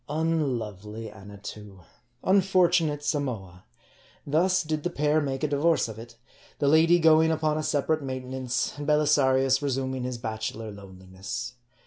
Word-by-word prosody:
Unlovely 115 - -2
Annatoo! 100 -1 -11 0.4
Unfortunate 180 -6 +3
Samoa! 115 - -3 0.6
Thus 180 +5 +2
did 155 -1 -2
the 175 - -2
pair 150 -1 +1
make 135 0 -3
a - - +3
divorce 150 +2 +2
of 110 -1 -8
it; 115 0 -12 0.4
the 140 - 0
lady 160 +4 +5
going 160 -1 +5
upon 155 -1 0
a - - -1
separate 155 +1 0
maintenance, 130 -1 -3
and 145 - -5
Belisarius 135 -3 +3
resuming 130 -2 -2
his 125 0 -3
bachelor 110 -1 -5
loneli 95 -2 -13
ness. 105 +6 -5
135 Hz, 135 wpm, -26 LUFS, 110-155 Hz, 0.6 s, lady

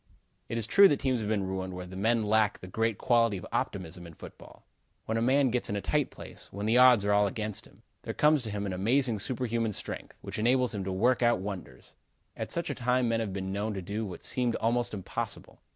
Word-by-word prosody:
It 115 - -2
is 115 - 0
true 200 - +7
that 145 - +1
teams 130 -2 0
have 105 -1 -3
been 105 -3 0
ruined 95 -1 -4
where 90 0 -6
the 90 +1 -10
men 110 +4 +1
lack 110 0 +2
the - - -11
great 110 +3 -1
quality 115 -4 +2
of 90 - -8
optimism 90 -2 -3
in 80 - -13
football. - - -13 0.4
When 110 - -2
a 115 - +1
man 130 +2 +3
gets 125 0 -1
in 100 - -1
a 100 - -2
tight 145 +8 0
place, - - -12
when 100 +2 -5
the 115 +3 +4
odds 125 -5 +7
are 105 - +3
all 105 0 +4
against 105 0 -4
him, - - -23 0.2
there - - -6
comes 150 -1 +4
to 115 - -6
him 100 -1 -3
an 95 - -3
amazing 115 +4 +1
superhuman 115 -1 -2
strength, - - -6
which - - -6
enables 125 +1 +2
him 100 -2 -3
to 95 - -2
work 120 +7 +2
out 120 -5 +3
wonders. 90 -10 -8 0.4
At - - -5
such 170 -3 -1
a - - -1
time 125 -1 +1
men 115 0 +1
have 110 -3 -2
been 95 0 -4
known 105 +1 -2
to 95 - -4
do 105 +5 -3
what 95 -4 -7
seemed 125 -2 0
almost 120 0 0
impossible. 95 - -5
110 Hz, 240 wpm, -29 LUFS, 100-120 Hz, 0.4 s, true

